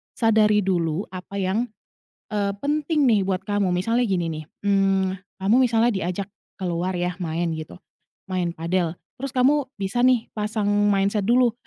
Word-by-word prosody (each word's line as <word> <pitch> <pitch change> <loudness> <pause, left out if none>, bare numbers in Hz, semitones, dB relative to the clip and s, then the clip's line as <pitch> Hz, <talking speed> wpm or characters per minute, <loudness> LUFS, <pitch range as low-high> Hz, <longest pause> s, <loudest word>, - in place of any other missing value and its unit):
sadari 215 -2 +3
dulu 175 -2 0
apa 185 +1 -8
yang, 200 +5 0 0.6
eee, 200 -1 0
penting 300 +1 +1
nih, 225 -6 +4
buat 185 -1 -1
kamu. 205 -1 0
Misalnya, 230 +7 +1
gini 175 -4 0
nih, 155 0 -5 0.2
mmm, 195 -1 +2 0.3
kamu 205 +4 +4
misalnya 235 -2 +3
diajak 190 -1 -2 0.3
keluar 180 0 -2
ya, 180 +1 -2
main, 170 -1 -1
gitu, 160 -1 -6 0.6
main 175 -2 -1
padel. 170 0 -1 0.3
Terus, 275 - -2
kamu 280 +2 +3
bisa 200 +4 -1
nih, 250 -2 +3
pasang 210 0 -2 0.2
mindset 200 +1 +2
dulu, 240 +3 +3
200 Hz, 150 wpm, -23 LUFS, 180-225 Hz, 0.6 s, nih